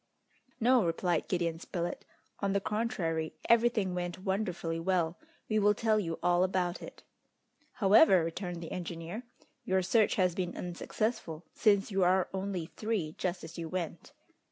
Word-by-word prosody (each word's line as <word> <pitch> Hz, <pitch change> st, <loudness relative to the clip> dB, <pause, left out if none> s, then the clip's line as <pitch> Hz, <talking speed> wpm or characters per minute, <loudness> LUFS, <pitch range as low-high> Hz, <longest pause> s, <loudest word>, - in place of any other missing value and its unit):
"No," 245 Hz, 0 st, +4 dB
replied 170 Hz, 0 st, 0 dB
Gideon 170 Hz, -3 st, -1 dB
Spilett; 175 Hz, -1 st, -4 dB, 0.3 s
"on 200 Hz, -1 st, 0 dB
the 200 Hz, -, +2 dB
contrary, 190 Hz, -8 st, -2 dB
everything 230 Hz, -5 st, +3 dB
went 175 Hz, -1 st, -3 dB
wonderfully 185 Hz, -4 st, -1 dB
well. 170 Hz, -1 st, 0 dB, 0.3 s
We 215 Hz, -1 st, +2 dB
will 210 Hz, 0 st, +4 dB
tell 215 Hz, 0 st, +2 dB
you 165 Hz, -5 st, -3 dB
all 175 Hz, 0 st, +4 dB
about 185 Hz, -2 st, 0 dB
it." -, -, -10 dB, 0.7 s
"However," 200 Hz, -, +6 dB
returned 175 Hz, +1 st, -4 dB
the 165 Hz, -, -7 dB
engineer, 170 Hz, +3 st, -5 dB, 0.4 s
"your 190 Hz, 0 st, +1 dB
search 215 Hz, +4 st, +3 dB
has 180 Hz, -3 st, +2 dB
been 180 Hz, -1 st, -3 dB
unsuccessful, 175 Hz, -2 st, -3 dB
since 205 Hz, -2 st, +3 dB
you 195 Hz, -1 st, +2 dB
are 185 Hz, +1 st, +3 dB
only 190 Hz, -3 st, -3 dB
three 210 Hz, -8 st, -2 dB
just 180 Hz, -1 st, -2 dB
as 165 Hz, +1 st, -8 dB
you 165 Hz, -1 st, -4 dB
went!" 175 Hz, -, -4 dB
185 Hz, 150 wpm, -31 LUFS, 170-205 Hz, 0.7 s, However